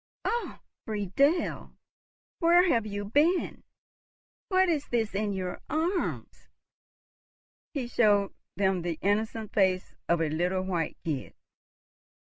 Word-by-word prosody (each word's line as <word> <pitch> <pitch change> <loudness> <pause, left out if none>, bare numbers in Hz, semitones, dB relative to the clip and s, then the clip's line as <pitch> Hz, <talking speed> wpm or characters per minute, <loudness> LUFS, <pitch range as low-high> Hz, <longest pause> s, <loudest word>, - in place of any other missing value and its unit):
— - - -49
"Oh, 475 +1 -2 0.3
Friedel, 220 - 0 0.6
where 345 +2 +5
have 230 -9 +2
you 205 0 -4
been? 300 - +1 0.8
What 375 -1 +3
is 310 -5 0
this 225 -4 0
in 205 +1 -1
your 185 -2 -4
arms?" 340 +4 -2 1.3
He 270 -4 -1
showed 205 -5 +3 0.2
them 190 -2 +1
the 170 -2 -3
innocent 215 +2 0
face 185 -2 +2 0.2
of 170 0 +3
a 160 -2 +1
little 180 +4 0
white 175 -4 -2
kid. 150 -5 -3
205 Hz, 115 wpm, -28 LUFS, 185-290 Hz, 1.3 s, where